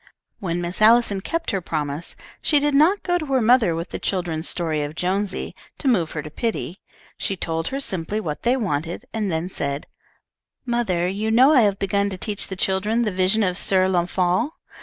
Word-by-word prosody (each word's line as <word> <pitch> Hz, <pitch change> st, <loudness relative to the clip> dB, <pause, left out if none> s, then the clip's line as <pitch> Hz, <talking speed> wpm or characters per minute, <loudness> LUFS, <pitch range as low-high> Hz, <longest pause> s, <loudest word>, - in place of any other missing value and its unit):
When 175 Hz, -2 st, -2 dB
Miss 175 Hz, +3 st, -2 dB
Allison 220 Hz, -3 st, +5 dB
kept 330 Hz, -, -2 dB
her 195 Hz, -, -1 dB
promise 150 Hz, -1 st, -3 dB, 0.3 s
she 295 Hz, -, +4 dB
did 290 Hz, 0 st, +1 dB
not 320 Hz, +8 st, +4 dB
go 355 Hz, -1 st, +1 dB
to 310 Hz, -, -4 dB
her 270 Hz, -1 st, +2 dB
mother 230 Hz, -6 st, +4 dB
with 165 Hz, +1 st, -4 dB
the -, -, -4 dB
children's 175 Hz, -4 st, -2 dB
story 160 Hz, -4 st, -1 dB
of 145 Hz, +1 st, -4 dB
Jonesy, 190 Hz, +3 st, -1 dB, 0.2 s
to 285 Hz, -, -4 dB
move 180 Hz, -, +2 dB
her 150 Hz, -, -4 dB
to 150 Hz, -, -9 dB
pity. 215 Hz, -2 st, -3 dB, 0.4 s
She 195 Hz, -, -2 dB
told 165 Hz, -1 st, -2 dB
her 270 Hz, -, -3 dB
simply 195 Hz, -4 st, -2 dB
what 155 Hz, -8 st, -4 dB
they 245 Hz, +2 st, +2 dB
wanted, 175 Hz, -, -3 dB
and 215 Hz, -4 st, -1 dB
then 165 Hz, +3 st, -2 dB
said, 140 Hz, -2 st, -3 dB, 0.8 s
"Mother, 220 Hz, -8 st, 0 dB
you 205 Hz, +4 st, -2 dB
know 255 Hz, +7 st, +6 dB
I 260 Hz, -, +6 dB
have 200 Hz, -3 st, +2 dB
begun 200 Hz, +1 st, 0 dB
to 190 Hz, -, -6 dB
teach 205 Hz, +2 st, -2 dB
the 190 Hz, -, -5 dB
children 200 Hz, +5 st, +1 dB
the 215 Hz, -, 0 dB
'Vision 190 Hz, +4 st, +2 dB
of 180 Hz, -1 st, 0 dB
Sir 185 Hz, -1 st, +3 dB
Launfal.' 185 Hz, -, +1 dB
190 Hz, 200 wpm, -22 LUFS, 175-230 Hz, 0.8 s, know